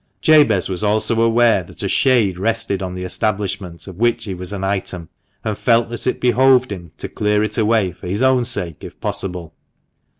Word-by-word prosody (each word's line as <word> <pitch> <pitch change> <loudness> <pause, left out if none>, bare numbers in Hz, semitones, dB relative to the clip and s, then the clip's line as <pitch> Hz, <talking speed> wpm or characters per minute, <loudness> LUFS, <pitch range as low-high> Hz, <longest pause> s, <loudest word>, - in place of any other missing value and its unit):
Jabez 145 - +4
was 95 +1 -4
also 110 +2 +1
aware 115 -2 +3
that 85 - -10
a - - 0
shade 110 -9 +2
rested 100 -2 -1
on 90 -1 -4
the 90 - -5
establishment 90 -2 -3
of 95 -3 -10
which 120 0 +1
he 100 - -4
was 90 +1 -7
an 100 -2 -5
item, 95 -4 -3 0.3
and 110 - -2
felt 115 +1 +2
that 120 +1 -4
it 125 - 0
behoved 125 0 +3
him 85 -5 -7
to - - -6
clear 105 0 0
it 110 0 -3
away 110 -4 +2
for 90 - -11
his 100 +7 -1
own 130 -1 +3
sake, 90 -10 -3
if - - -10
possible. 90 -4 -4
105 Hz, 195 wpm, -19 LUFS, 90-115 Hz, 0.3 s, Jabez